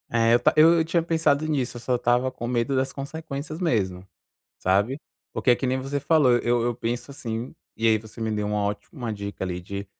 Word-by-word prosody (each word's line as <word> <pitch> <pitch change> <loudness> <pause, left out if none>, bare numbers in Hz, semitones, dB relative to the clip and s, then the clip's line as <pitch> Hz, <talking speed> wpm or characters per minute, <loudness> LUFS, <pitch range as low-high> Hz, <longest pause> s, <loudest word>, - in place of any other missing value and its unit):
É 115 0 +3
eu 120 - +5
ta 120 - +3
eu 160 +2 +8
eu 160 - +1
tinha 170 +1 +1
pensado 160 -3 +2
nisso, 130 -5 -1
eu - - -9
só 125 +1 0
estava 120 +2 +1
com 120 -2 -6
medo 120 +2 0
das 130 0 0
consequências 155 +1 -6
mesmo, 95 - -1 0.5
sabe? 100 +9 +1 0.3
Porque - - +1
é 120 - +6
que 130 - -2
nem 130 +1 0
você 135 +2 -2
falou, 145 -3 +4
eu 120 0 +1
eu 120 0 0
penso 120 +3 -3
assim, 120 -3 -5 0.2
e 115 - 0
aí 110 -1 +5
você 110 +2 -13
me 110 -1 -1
deu 105 -1 -1
uma 105 0 0
ótima 115 - -4
dica 100 -2 -5
ali 90 -1 -3
de 100 +3 -6
120 Hz, 220 wpm, -25 LUFS, 110-140 Hz, 0.5 s, eu